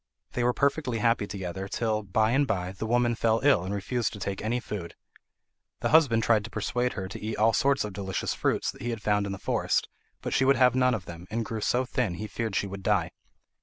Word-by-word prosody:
They 125 - -1
were 125 - +4
perfectly 140 -2 0
happy 115 -2 +2
together 95 -1 -5
till, 110 +1 -1
by 110 +3 +1
and 140 +2 +3
by, 90 -5 -1
the 100 +3 -5
woman 120 0 +2
fell 115 0 +2
ill 135 -11 +4
and 95 - -4
refused 110 +4 -1
to 105 - -8
take 95 0 -3
any 115 +3 0
food. 100 -7 -6 0.9
The - - +1
husband 135 -8 +5
tried 110 -2 +3
to - - -7
persuade 120 +3 -1
her 95 -2 -4
to 95 - -8
eat 110 +1 -3
all 110 +2 +4
sorts 140 +4 +2
of 105 -2 -5
delicious 95 -1 -2
fruits - - 0
that - - -16
he 120 - -2
had 115 -3 -4
found 105 -1 +1
in - - -4
the 100 - -4
forest, - - 0 0.4
but - - -2
she - - +3
would 135 +1 +5
have 125 0 +5
none 125 -1 +3
of 95 -5 -6
them, 85 +1 -9
and 115 +1 -2
grew 110 -1 -4
so 125 +4 +1
thin 120 -7 -1
he 105 - -5
feared 110 -1 -3
she - - +1
would 100 0 -7
die. - - +1
110 Hz, 240 wpm, -28 LUFS, 100-120 Hz, 0.9 s, husband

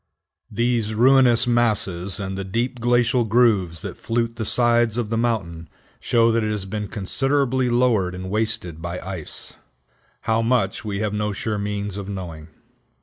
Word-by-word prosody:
These 115 -1 0
ruinous 125 -1 +5
masses, 105 -6 +1
and 95 -1 -4
the 95 - -4
deep 120 +6 -2
glacial 120 0 +2
grooves 105 -8 +2
that - - -7
flute 115 0 -1
the 110 - -3
sides 120 -1 +2
of 115 -3 -2
the - - +1
mountain, 90 -9 -2 0.3
show 115 -1 +3
that 115 0 +1
it 110 - -1
has 105 -2 -2
been 105 +1 -4
considerably 130 +5 0
lowered 120 -7 +2
and 95 +1 -6
wasted 95 -7 -2
by 85 +1 -4
ice; 95 -5 -6 0.6
how 110 0 +1
much 115 -5 0
we 105 -2 -3
have 105 -1 -1
no 105 0 -1
sure 110 0 -3
means 100 -1 -3
of 100 -1 -6
knowing. 85 -6 -7
110 Hz, 160 wpm, -22 LUFS, 95-120 Hz, 0.6 s, ruinous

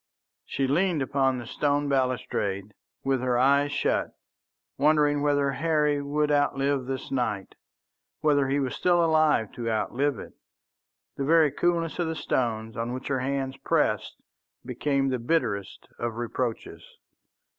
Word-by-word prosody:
She 135 - -1
leaned 160 +2 +1
upon 135 -1 +1
the 120 - -6
stone 145 +4 0
balustrade 125 -7 -1 0.3
with 135 -2 +1
her 125 -1 +1
eyes 140 +3 +3
shut, 145 - -1 0.6
wondering 150 -1 +3
whether 145 -1 +2
Harry 150 -1 +1
would 150 +1 0
outlive 140 -2 +1
this 135 0 -5
night, 120 -7 -2 0.7
whether 145 -3 +3
he 140 +2 +1
was 130 -2 -1
still 175 -1 +2
alive 155 -9 +3
to 115 -1 -4
outlive 120 +5 0
it. - - -9 0.8
The 140 - -1
very 160 -1 +4
coolness 170 0 0
of 175 - 0
the 160 - -2
stones 110 -6 -2
on 115 +2 -3
which 130 - -6
her 135 -2 0
hands 135 0 -2
pressed - - 0 0.5
became 135 +2 0
the 130 -1 -1
bitterest 115 - -2
of 120 -1 -3
reproaches. 120 0 -4
140 Hz, 140 wpm, -26 LUFS, 125-145 Hz, 0.8 s, very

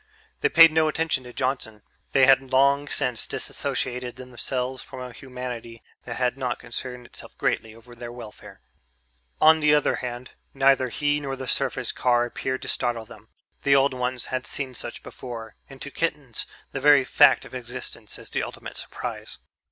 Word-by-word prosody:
They - - +2
paid 165 0 +9
no 160 0 +3
attention 155 -4 0
to 125 - -9
Johnson 125 -5 -2 0.3
they 135 -1 +6
had 135 0 +6
long 140 +2 +4
since 125 -4 +1
dissociated 125 0 -2
themselves 125 0 -4
from 130 - -10
a 125 -1 -7
humanity 125 -3 -7 0.2
that 120 - -5
had 125 +1 0
not 125 -2 -1
concerned 125 +1 -6
itself - - -12
greatly 110 -1 -1
over 115 +1 -14
their 120 0 -8
welfare. 120 -3 -11 0.8
On 160 +1 +7
the 150 -1 +5
other 150 - +2
hand, 125 0 -6 0.2
neither 135 -1 +4
he 145 +4 +1
nor 135 -2 -4
the 130 -1 -7
surface - - 0
car 120 -1 +2
appeared 130 +2 -3
to - - -6
startle 120 -3 -1
them; 110 0 -15 0.3
the 140 -1 +4
old 135 0 +4
ones 125 0 -2
had 130 -1 -2
seen 135 -2 -4
such - - -6
before, 115 -4 -8
and 135 -1 -12
to 140 - -7
kittens 145 -7 -2 0.2
the - - -3
very 145 -2 +6
fact - - +5
of - - -13
existence - - -5
is - - -8
the - - 0
ultimate - - -6
surprise. - - -6
130 Hz, 175 wpm, -25 LUFS, 120-140 Hz, 0.8 s, paid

